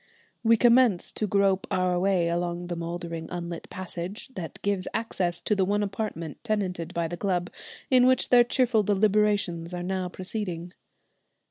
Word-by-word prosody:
We 230 Hz, 0 st, +5 dB
commence 240 Hz, -5 st, +4 dB
to 215 Hz, -, -2 dB
grope 195 Hz, -1 st, +2 dB
our 180 Hz, -1 st, +1 dB
way 185 Hz, -2 st, +2 dB
along 175 Hz, +1 st, -2 dB
the 175 Hz, 0 st, -4 dB
mouldering, 170 Hz, -1 st, -5 dB
unlit 170 Hz, -1 st, -6 dB
passage 185 Hz, +4 st, -6 dB
that 180 Hz, -11 st, -7 dB
gives 200 Hz, -2 st, 0 dB
access 180 Hz, -6 st, -1 dB
to 210 Hz, -, +1 dB
the 195 Hz, -, +2 dB
one 205 Hz, +2 st, +1 dB
apartment 195 Hz, -6 st, -4 dB
tenanted 185 Hz, -7 st, -2 dB
by 170 Hz, -1 st, 0 dB
the 175 Hz, -, -5 dB
club, 180 Hz, -2 st, -1 dB, 0.4 s
in 255 Hz, -1 st, +6 dB
which 260 Hz, 0 st, +3 dB
their 245 Hz, -1 st, +7 dB
cheerful 240 Hz, -2 st, +2 dB
deliberations 205 Hz, -4 st, +1 dB
are 175 Hz, -, -4 dB
now 185 Hz, 0 st, -2 dB
proceeding. 180 Hz, -2 st, -5 dB
185 Hz, 155 wpm, -27 LUFS, 175-210 Hz, 0.4 s, their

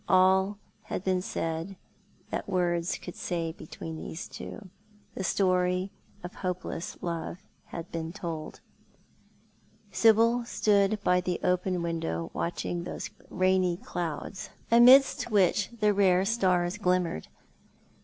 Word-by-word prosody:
All 190 Hz, +2 st, +4 dB, 0.3 s
had -, -, -4 dB
been 185 Hz, -1 st, +1 dB
said 165 Hz, +1 st, -3 dB, 0.6 s
that -, -, -3 dB
words 175 Hz, -1 st, 0 dB
could 180 Hz, -, -9 dB
say 165 Hz, -2 st, -2 dB
between 160 Hz, 0 st, -8 dB
those 165 Hz, -, -6 dB
two. 205 Hz, -, -9 dB, 0.5 s
The 190 Hz, -, -4 dB
story 185 Hz, 0 st, +1 dB, 0.3 s
of 175 Hz, -, -7 dB
hopeless 180 Hz, -2 st, -4 dB
love 170 Hz, 0 st, -3 dB, 0.3 s
had 170 Hz, 0 st, -8 dB
been 165 Hz, -1 st, -4 dB
told. 165 Hz, -4 st, -6 dB, 1.3 s
Sibyl 230 Hz, +2 st, +4 dB
stood 210 Hz, -2 st, +2 dB
by 180 Hz, -2 st, +3 dB
the 180 Hz, -1 st, -2 dB
open 180 Hz, -1 st, +1 dB
window 120 Hz, -, -3 dB
watching 175 Hz, 0 st, -2 dB
those -, -, -6 dB, 0.2 s
rainy 185 Hz, -1 st, +2 dB
clouds, 175 Hz, +2 st, -5 dB, 0.2 s
amidst 245 Hz, +1 st, +7 dB
which 205 Hz, -2 st, +3 dB
the 210 Hz, -1 st, +3 dB
rare 190 Hz, -2 st, +4 dB
stars 185 Hz, -3 st, +1 dB
glimmered. 180 Hz, -, 0 dB
180 Hz, 115 wpm, -28 LUFS, 170-195 Hz, 1.3 s, amidst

